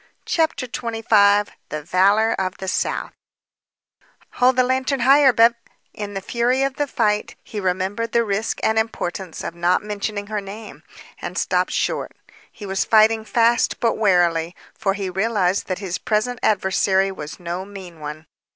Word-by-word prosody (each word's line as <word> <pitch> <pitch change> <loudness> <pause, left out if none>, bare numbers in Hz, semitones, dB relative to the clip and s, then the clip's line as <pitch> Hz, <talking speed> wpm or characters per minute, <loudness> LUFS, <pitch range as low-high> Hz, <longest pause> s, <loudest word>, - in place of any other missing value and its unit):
CHAPTER 320 -5 0
XXV 220 -4 +2 0.2
THE 155 0 -5
VALOR 200 +7 +3
OF 185 0 -2
THE 190 - -7
SOUTH - - -1 1.2
"Hold 250 +1 +3
the 255 - +4
lantern 260 +1 0
higher, 275 +2 +6
Bev 230 0 +5 0.3
" - - -45
In 205 -1 -6
the 195 - -3
fury 245 +5 0
of 275 0 -2
the 290 - 0
fight, 215 -6 0
he 215 - -6
remembered 190 +4 -2
the 235 - +3
risk 215 +1 -2
and 220 0 +3
importance 190 -5 -4
of - - -4
not 175 +3 +1
mentioning 205 0 -4
her 210 0 -3
name, 205 +3 -10 0.4
and - - -5
stopped - - +1
short. - - -1 0.4
He 210 - -10
was 195 -1 0
fighting 220 0 +4
fast 235 +1 +2
but 230 -2 +2
warily, 175 -5 +2 0.2
for 195 -3 -1
he 200 -2 -3
realized 195 0 0
that 185 - -2
his 185 -3 -4
present 240 +1 -1
adversary 190 -1 +2
was 150 -5 -8
no 175 +1 -4
mean 190 -4 -11
one. 150 +1 -7
205 Hz, 160 wpm, -21 LUFS, 190-230 Hz, 1.2 s, higher